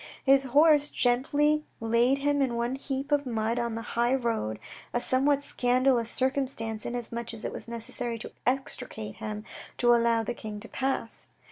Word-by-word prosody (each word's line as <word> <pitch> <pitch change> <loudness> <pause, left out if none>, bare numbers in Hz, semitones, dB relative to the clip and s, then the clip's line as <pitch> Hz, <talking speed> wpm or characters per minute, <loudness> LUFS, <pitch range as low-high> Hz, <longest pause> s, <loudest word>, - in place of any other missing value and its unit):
His 270 0 +5
horse 295 +2 +5
gently 290 +5 +2 0.2
laid 235 +4 +3
him 285 0 +1
in 270 - +2
the 235 - -4
one 235 +2 -1
heap 270 +1 -4
of 290 -2 +2
mud 225 0 0
on 235 -1 -2
the 230 - -4
high 240 +3 +1
road, 225 - -1 0.4
a - - +3
somewhat 275 +3 +2
scandalous 250 -2 +2
circumstance, 255 -5 0
inasmuch 235 -1 -4
as 220 - -6
it - - -3
was - - -6
necessary 235 0 -4
to 225 - -8 0.2
extricate 250 - -3
him 210 0 -5 0.3
to 240 -1 +5
allow 230 -1 +3
the 240 - -3
King 215 -3 -7
to - - -9
pass. 265 -4 -3
245 Hz, 170 wpm, -28 LUFS, 230-270 Hz, 0.4 s, His